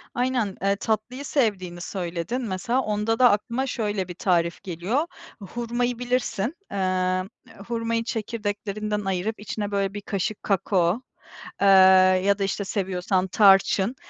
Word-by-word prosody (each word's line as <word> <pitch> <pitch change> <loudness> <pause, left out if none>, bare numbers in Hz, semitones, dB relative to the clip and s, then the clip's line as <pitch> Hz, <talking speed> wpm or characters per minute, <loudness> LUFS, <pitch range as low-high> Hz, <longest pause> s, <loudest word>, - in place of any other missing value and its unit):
Aynen, 245 -5 0
eee, 195 0 +2
tatlıyı 225 +6 -3
sevdiğini 190 -11 -1
söyledin, 175 +6 -3
mesela 235 +4 -1
onda 210 +1 -1
da 250 -3 +7
aklıma 235 +6 -1
şöyle 205 -6 -2
bir 180 - -6
tarif 170 -2 0
geliyor. 195 - -1 0.4
Hurmayı 240 +3 -2
bilirsin. 245 - -1 0.2
Eee, 185 -1 0 0.4
hurmayı 230 -1 -1
çekirdeklerinden 210 -2 -3
ayırıp 195 +4 -2
içine 210 0 -4
böyle 195 -1 0
bir 205 - -5
kaşık 200 +1 -3
kakao, 190 +1 +1 0.6
eee, 200 - +4 0.6
ya 200 0 +3
da 195 - 0
işte 195 +1 -1
seviyorsan 190 -1 -1
tarçın. 195 +3 +4
205 Hz, 130 wpm, -24 LUFS, 190-230 Hz, 0.6 s, da